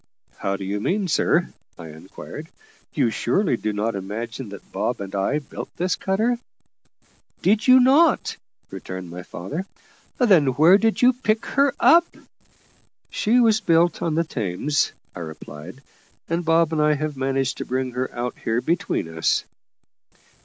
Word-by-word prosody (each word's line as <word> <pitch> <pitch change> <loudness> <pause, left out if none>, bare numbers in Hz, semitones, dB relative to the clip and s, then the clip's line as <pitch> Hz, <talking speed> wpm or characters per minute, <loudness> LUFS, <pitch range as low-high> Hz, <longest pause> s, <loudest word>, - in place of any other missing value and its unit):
"How 100 0 -1
do 100 - -6
you 100 +2 -2
mean, 190 - -1
sir?" 160 - +1 0.2
I 80 - -9
inquired. 80 +1 -10 0.4
"You 115 - +1
surely 150 - +1
do 110 -2 -2
not 105 +2 -1
imagine 110 +5 -5
that 100 -1 -12
Bob - - -2
and 95 -1 -7
I 100 +9 0
built 150 - -7
this 180 +2 0
cutter?" 225 +5 0 1.0
"Did 210 +5 +2
you 255 0 +8
not?" 280 +6 +4 0.4
returned 95 -2 -7
my 90 +1 -7
father. 145 - -6 0.5
"Then 190 - +4
where 170 +6 +6
did 225 +2 +1
you 250 +1 +6
pick 220 -3 -1
her 280 0 +1
up?" 340 +1 +6 1.0
"She 235 +4 +2
was 220 -2 +4
built 170 -2 +2
on 160 -2 -1
the 165 - +2
Thames," 130 - -1 0.2
I - - -7
replied; 80 - -9 0.4
"and 170 +1 -1
Bob 165 0 +2
and 155 - +1
I 150 0 +3
have 150 0 -3
managed 135 0 -1
to - - -4
bring 130 0 -2
her 125 +1 -3
out 120 +1 -4
here 115 +1 -1
between 165 - -1
us." 80 0 0
145 Hz, 155 wpm, -23 LUFS, -, 1.0 s, you